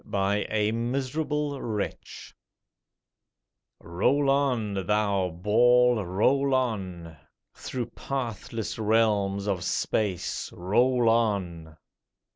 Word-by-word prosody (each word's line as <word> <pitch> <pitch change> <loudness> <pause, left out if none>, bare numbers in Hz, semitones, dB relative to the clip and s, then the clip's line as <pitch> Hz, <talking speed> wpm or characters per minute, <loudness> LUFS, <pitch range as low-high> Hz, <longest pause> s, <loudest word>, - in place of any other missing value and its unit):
BY 100 0 0
A 105 0 +1
MISERABLE 140 +4 -2
WRETCH 105 -3 -5 1.5
ROLL 135 +11 +1
on, 125 -7 0
thou 100 -3 +1
ball, 120 +6 +3
roll 130 +10 +2
on! 95 -10 -3 0.4
Through 125 -2 -5
pathless 115 -5 -5
realms 105 -3 +1
of 95 -4 -1
Space 95 -1 -2
Roll 120 +7 +2
on! 95 -9 0
110 Hz, 85 wpm, -26 LUFS, 100-125 Hz, 1.5 s, ball